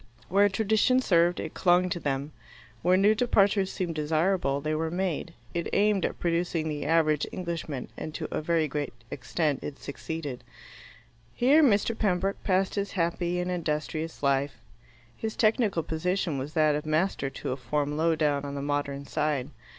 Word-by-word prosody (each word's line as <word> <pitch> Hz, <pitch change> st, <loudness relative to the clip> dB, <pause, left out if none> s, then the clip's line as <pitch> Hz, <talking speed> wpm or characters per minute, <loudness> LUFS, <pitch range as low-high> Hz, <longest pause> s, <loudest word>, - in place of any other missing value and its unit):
Where 200 Hz, +2 st, +4 dB
tradition 220 Hz, +5 st, +2 dB
served, 175 Hz, -7 st, +3 dB
it 160 Hz, -, -5 dB
clung 180 Hz, 0 st, +3 dB
to 180 Hz, -1 st, -2 dB
them. 140 Hz, -1 st, -2 dB, 0.5 s
Where 180 Hz, +2 st, +4 dB
new 205 Hz, +3 st, +5 dB
departures 205 Hz, -4 st, +2 dB
seemed 175 Hz, -3 st, -3 dB
desirable, 155 Hz, -1 st, +1 dB
they 155 Hz, +2 st, -2 dB
were 160 Hz, +1 st, -1 dB
made. 175 Hz, -1 st, -2 dB, 0.2 s
It 170 Hz, 0 st, -2 dB
aimed 205 Hz, -2 st, +3 dB
at -, -, -8 dB
producing 170 Hz, -1 st, 0 dB
the 150 Hz, -2 st, -3 dB
average 155 Hz, -2 st, +2 dB
Englishman, 165 Hz, -7 st, -4 dB
and, 155 Hz, -, -6 dB
to -, -, -3 dB
a -, -, -1 dB
very 160 Hz, 0 st, +1 dB
great 145 Hz, -3 st, -4 dB, 0.2 s
extent, 140 Hz, +3 st, -1 dB
it 140 Hz, -, -6 dB
succeeded. 145 Hz, -2 st, -6 dB, 0.9 s
Here 275 Hz, +6 st, +5 dB
Mr. 230 Hz, -4 st, +3 dB
Pembroke 195 Hz, -2 st, 0 dB
passed 190 Hz, 0 st, +1 dB
his 200 Hz, -1 st, -2 dB
happy 175 Hz, 0 st, 0 dB
and 180 Hz, +1 st, -2 dB
industrious 155 Hz, -2 st, -3 dB
life. 140 Hz, -1 st, +1 dB, 0.6 s
His 220 Hz, -, -4 dB
technical 215 Hz, -6 st, +2 dB
position 165 Hz, -1 st, -1 dB
was 140 Hz, +4 st, -5 dB
that 155 Hz, -2 st, +3 dB
of 150 Hz, +1 st, -2 dB
master 155 Hz, -3 st, 0 dB
to 135 Hz, -, -5 dB
a -, -, -1 dB
form 145 Hz, +2 st, -2 dB
low 160 Hz, +1 st, +2 dB
down 145 Hz, -2 st, +1 dB
on 140 Hz, 0 st, -5 dB
the 140 Hz, -, -4 dB
Modern 140 Hz, -1 st, -2 dB
Side. 150 Hz, -2 st, -1 dB
165 Hz, 165 wpm, -28 LUFS, 150-190 Hz, 0.9 s, new